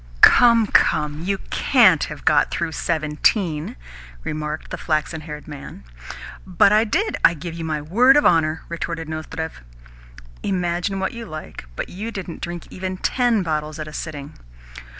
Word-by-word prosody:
"Come, 235 -2 +7
come! 150 -6 +2
You 195 +3 -1
CAN'T 210 - +4
have 150 -2 -9
got 155 -2 +4
through 170 -1 -2
seventeen," 155 +1 0 0.5
remarked 150 0 -5
the - - -3
flaxen 155 0 -1
haired 150 0 -9
man. 145 - -9 0.6
"But 185 +1 +3
I 215 +2 +4
did, 370 - 0
I 170 - +6
give 170 +1 -7
my 155 -2 -3
word 245 - +5
of 295 - +3
honour," 160 -2 +2
retorted 165 -1 -4
Nozdrev. 160 - -6 0.8
"Imagine 180 0 -1
what 190 - -2
you 235 -1 -7
like, 155 - -8
but - - -4
you 210 +5 -6
didn't 190 -6 -7
drink 175 -1 -5
even 185 0 -4
TEN 240 -1 +1
bottles 155 -2 -3
at 155 -1 -6
a 155 - -9
sitting." 150 -2 -7
165 Hz, 150 wpm, -21 LUFS, 155-195 Hz, 0.8 s, Come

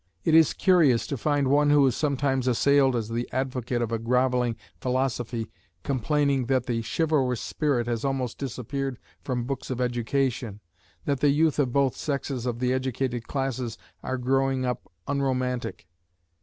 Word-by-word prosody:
It 160 - +2
is 160 -1 +6
curious 160 - +4
to 140 - -3
find 145 +1 +1
one 145 +2 +4
who 145 -1 +6
is 130 - +2
sometimes 135 -3 0
assailed 135 +1 +4
as 115 -3 -1
the 120 +1 -3
advocate 125 -2 -1
of 115 - -3
a 115 - 0
grovelling 125 0 +1 0.2
philosophy 125 -3 -2 0.3
complaining 140 0 +1
that 130 -2 +1
the 115 -1 -1
chivalrous 130 -1 0
spirit 135 0 0
has 120 -1 -2
almost 135 -3 -2
disappeared 135 0 -3 0.3
from 125 -3 -2
books 135 +1 -4
of 130 -2 -3
education, 120 -2 -1 0.5
that 140 -2 0
the 145 - +4
youth 150 +1 +2
of 130 -4 +2
both 135 -1 +2
sexes 140 -3 -3
of 120 -1 -1
the 125 +1 +1
educated 130 -2 -2
classes 130 -5 -2 0.2
are 130 - -3
growing 135 +1 +1
up 125 -1 -4 0.2
unromantic. 130 - -1
130 Hz, 155 wpm, -26 LUFS, 120-140 Hz, 0.5 s, is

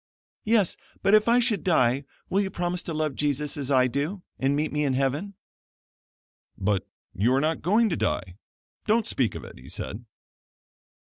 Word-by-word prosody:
"Yes, 215 -4 +2 0.3
but 195 - +4
if 215 +1 +6
I 235 +1 +5
should 230 -4 +1
die, 135 -6 +2 0.2
will 195 - +2
you 195 - -1
promise 175 0 -2
to - - -6
love 155 -2 0
Jesus 145 +1 0
just - - -2
as 140 -2 -4
I 130 -2 +5
do, 145 - -2 0.2
and 135 +1 +2
meet 150 +2 0
me 150 0 +1
in 140 -2 +1
heaven?" 140 +10 -1 1.2
"But 100 0 0 0.3
you 110 +7 +2
are - - +3
not 155 +3 0
going 215 +7 +3
to 170 - 0
die. 90 0 -2 0.5
Don't 220 +1 +3
speak 125 -5 0
of - - -6
it," - - -11
he 65 - -13
said. 110 +4 -5
150 Hz, 180 wpm, -26 LUFS, 130-195 Hz, 1.2 s, if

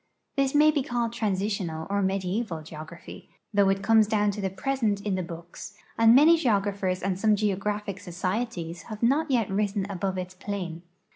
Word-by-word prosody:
This 275 0 +1
ma}' 305 +1 +6
he 295 -2 0
called 240 -2 -2
transitional 195 -7 -2
or 200 0 0
medieval 190 -2 -1
geography, 155 +2 -10 0.2
though 200 -1 +4
it 195 0 0
comes 220 0 +5
down 210 -1 +2
to 205 +1 -5
the 190 - 0
present 210 +1 -1
in 205 -1 -2
the 185 - 0
books, 170 +3 -9 0.2
and 225 +1 +6
many 315 +5 +7
geographers 200 - 0
and 190 -1 -1
some 215 0 +4
geographic 205 -1 -2
societies 180 -2 -3
have 215 0 -6
not 285 +6 +2
yet 235 -7 +1
risen 200 0 0
above 190 0 -2
its 185 0 -5
plane. 185 -3 -5
200 Hz, 170 wpm, -27 LUFS, 185-225 Hz, 0.2 s, many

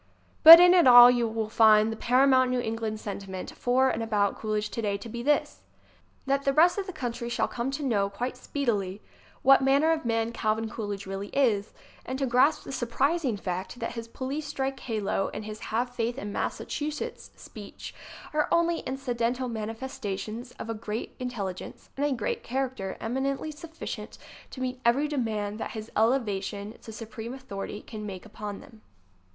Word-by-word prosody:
But 330 +1 +13
in 355 0 +7
it 350 -6 +6
all 245 0 +10
you 240 -2 +1
will 220 -1 -2
find 215 0 +5
the - - -4
paramount 255 +2 +4
New 250 0 0
England 220 -2 -3
sentiment 195 -3 -6
for 260 +1 +2
and 230 - -3
about 210 -3 +1
Coolidge 215 -1 -2
today 205 -3 -1
to 200 - -9
be 235 +1 -6
this: 290 +4 0 0.6
That 275 0 +1
the 275 - +1
rest 345 +6 +4
of 395 - -4
the - - -4
country 240 -6 -4
shall - - 0
come 240 +2 -3 0.4
quite 240 +6 -4
speedily 225 -8 -2
to - - -29
know - - -31 0.3
what 270 +1 +7
manner 280 +4 +3
of 320 -1 0
man 230 -1 0
Calvin 220 -1 -1
Coolidge 205 -3 -5
really 195 +1 -5
is, 225 -6 +1 0.3
and 260 - -4
to 275 - 0
grasp 260 +5 +3
the - - -8
surprising 265 +1 0
fact 185 +3 -4
that 235 - -4
his 230 -1 -7
police 275 +5 -5
strike 270 -2 -3
halo 210 -4 -2
and 210 - -5
his 215 0 -7
"Have 245 +3 -2
Faith 235 +1 -2
in 205 -5 -5
Massachusetts" 305 +10 -4
speech 210 -2 -10 0.4
are 300 0 +1
only 340 0 +2
incidental 250 -1 -2
mani 220 -1 -4
festations 225 -1 -6
of - - -7
a 225 - -2
great 215 0 -5
intelligence 210 -8 -6
and 285 +2 0
a - - -1
great 235 -5 -2
char 265 +2 -1
acter 195 -7 -6
eminently 270 +5 -2
sufficient 320 +2 -8 0.3
to 260 - -9
meet 255 0 -3
every 260 +6 +3
demand 220 -7 -2
that - - -5
his 220 0 -7
elevation 210 -3 0
to 225 - -10
supreme 225 +2 -7
authority 205 -5 -7
can 215 -2 -8
make 195 -2 -7
upon 210 -1 -7
them. 220 -2 -16
235 Hz, 180 wpm, -27 LUFS, 215-265 Hz, 0.6 s, But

